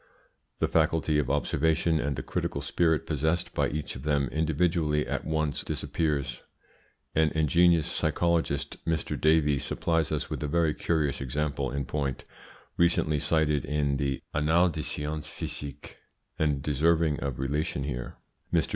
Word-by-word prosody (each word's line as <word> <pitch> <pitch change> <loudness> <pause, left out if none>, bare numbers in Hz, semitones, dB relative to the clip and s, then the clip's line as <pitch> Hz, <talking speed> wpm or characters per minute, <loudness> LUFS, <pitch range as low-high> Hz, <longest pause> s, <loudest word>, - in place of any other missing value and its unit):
The - - +1
faculty 80 -2 +2
of 70 - -1
observation 80 +3 +1
and 70 -1 -1
the - - -5
critical - - -2
spirit 80 -3 +1
possessed 80 +4 -1
by - - +1
each 75 0 -4
of 65 - -7
them 70 -2 +1
individually 80 -1 +1
at - - -3
once 80 -2 -1
disappears. 70 -6 -2 0.7
An 80 0 +3
ingenious 85 +1 +4
psychologist, 85 -5 0
Mr. 80 -2 -1
Davey, 75 -2 +3
supplies 80 +1 0
us - - -1
with - - -5
a 75 - -1
very 80 0 +2
curious 75 -5 0
example 70 0 -1
in 70 +1 -3
point, 70 -1 -3 0.5
recently 85 -3 +3
cited 75 -2 +2
in 70 -2 0
the 70 -1 -2
Annales 80 +4 +3
des 80 - -4
Sciences 75 0 -4
Psychiques, 70 -2 -6 0.5
and 75 -3 +1
deserving 80 +1 +2
of 70 -3 -3
relation 70 +1 -1
here. 60 -3 -4 0.4
Mr. - - +2
75 Hz, 145 wpm, -28 LUFS, 70-80 Hz, 0.7 s, ingenious